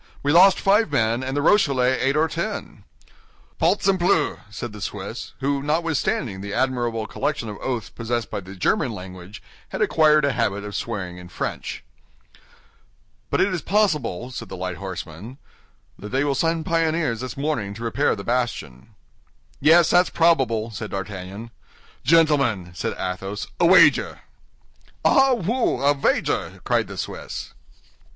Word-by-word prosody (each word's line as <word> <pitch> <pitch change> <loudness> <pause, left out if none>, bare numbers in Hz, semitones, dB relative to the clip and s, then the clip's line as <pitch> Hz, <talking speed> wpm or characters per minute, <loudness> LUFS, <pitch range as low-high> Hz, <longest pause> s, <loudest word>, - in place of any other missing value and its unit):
We 145 - +2
lost 185 +4 +7
five 205 -2 +3
men, 115 -3 +1
and 135 +2 -3
the 145 - 0
Rochellais 135 -9 +3
eight 135 +2 +1
or 160 +1 +3
ten." 170 +6 -5 0.7
"Balzempleu!" 185 -5 +2
said 110 +1 -6
the 105 - -10
Swiss, 100 +3 -6
who, 140 +1 0
notwithstanding 155 - -1
the 100 0 -5
admirable 120 -3 0
collection 115 - -3
of 105 - -7
oaths 125 -4 -3
possessed 120 0 -3
by - - -2
the 95 0 -10
German 105 +5 0
language, 95 +1 -10 0.3
had - - -5
acquired 155 -2 +4
a 140 - +2
habit 100 -5 -1
of 105 0 -7
swearing 90 -7 -4
in 90 0 -11
French. - - -5 1.5
"But - - +1
it 200 - +3
is 175 - -2
probable," 150 - 0
said 115 -5 -7
the - - -7
light 90 -1 -4
horseman, 95 - -7 0.6
"that 105 - -8
they 135 +4 +1
will 145 -1 +1
send 165 +2 0
pioneers 165 -7 0
this 130 -1 -6
morning 135 -9 -2
to 115 - -8
repair 125 +5 +1
the 100 - -7
bastion." 115 - -3 0.6
"Yes, 165 +3 +5
that's 180 +1 +4
probable," 130 -10 +2
said 110 0 -6
D'Artagnan. 100 +3 -6 0.5
"Gentlemen," 140 - +3
said 85 - -3
Athos, 95 +2 -4
"a 170 - +5
wager!" 185 - +5 0.8
"Ah, 270 -3 +5
wooi, 190 - +1
a - - +3
vager!" 140 - -1
cried - - +1
the - - -9
Swiss. - - -6
125 Hz, 150 wpm, -23 LUFS, 105-160 Hz, 1.5 s, lost